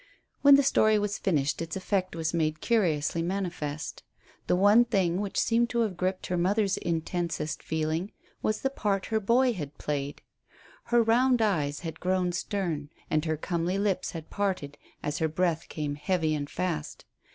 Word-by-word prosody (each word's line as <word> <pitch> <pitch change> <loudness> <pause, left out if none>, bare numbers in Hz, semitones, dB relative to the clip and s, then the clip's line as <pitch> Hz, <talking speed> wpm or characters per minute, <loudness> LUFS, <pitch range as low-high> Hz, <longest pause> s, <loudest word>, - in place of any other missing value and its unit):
When 280 -1 +9
the 280 - +5
story 215 -5 +4
was 205 0 -1
finished 150 -7 0
its 165 -1 -4
effect 190 -1 -1
was 160 -1 -2
made 155 -2 0
curiously 170 -8 +1
manifest. 170 -5 -3 0.5
The - - +3
one 205 +5 +6
thing 195 -6 +1
which 200 -2 -2
seemed 235 +1 +2
to 235 - +1
have 210 -5 0
gripped 185 +1 -2
her 180 - -1
mother's 200 +2 +2
intensest 165 -2 -2
feeling 160 +4 -2 0.3
was 215 - 0
the 270 - 0
part 200 -7 -1
her 220 - +3
boy 240 +4 +3
had 150 -7 -6
played. 145 -1 -3 0.6
Her 240 -1 +4
round 245 +2 +3
eyes 155 -10 0
had 160 -2 -6
grown 185 -1 +1
stern, 175 -5 -2 0.2
and 155 +1 +1
her 160 -1 0
comely 170 +3 -1
lips 200 -2 0
had 160 -2 -8
parted 185 -8 -2 0.3
as 150 0 -2
her 160 - +2
breath 165 0 -1
came 150 -2 -3
heavy 155 +2 0
and 145 -1 -3
fast. 170 -4 -3
180 Hz, 170 wpm, -28 LUFS, 155-205 Hz, 0.6 s, When